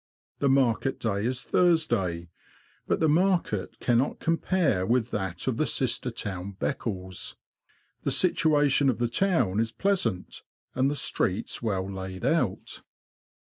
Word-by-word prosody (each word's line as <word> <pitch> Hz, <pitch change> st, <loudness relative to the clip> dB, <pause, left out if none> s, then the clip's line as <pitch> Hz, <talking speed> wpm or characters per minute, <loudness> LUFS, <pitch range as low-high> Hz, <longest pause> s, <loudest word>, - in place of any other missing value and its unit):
The 140 Hz, -, +2 dB
market 135 Hz, -1 st, +2 dB
day 105 Hz, -1 st, -1 dB
is 125 Hz, 0 st, -3 dB
Thursday; 115 Hz, -, +1 dB, 0.6 s
but -, -, +1 dB
the 160 Hz, -, +3 dB
market 170 Hz, -, +1 dB
cannot 120 Hz, +3 st, +1 dB
compare 165 Hz, -, +1 dB
with 120 Hz, +3 st, +1 dB
that 95 Hz, -4 st, -3 dB
of -, -, -1 dB
the -, -, +1 dB
sister -, -, 0 dB
town, 95 Hz, 0 st, -5 dB
Beccles. 95 Hz, -8 st, -3 dB, 0.7 s
The -, -, -1 dB
situation 145 Hz, -3 st, +3 dB
of 125 Hz, -, 0 dB
the 120 Hz, -, 0 dB
town 120 Hz, -, +1 dB
is 115 Hz, 0 st, 0 dB
pleasant, 120 Hz, -, -1 dB, 0.3 s
and 130 Hz, +2 st, +2 dB
the 145 Hz, -, -2 dB
streets 105 Hz, -7 st, -1 dB
well 95 Hz, -5 st, -1 dB
laid 95 Hz, -1 st, -6 dB
out. -, -, -1 dB
120 Hz, 135 wpm, -27 LUFS, 95-145 Hz, 0.7 s, the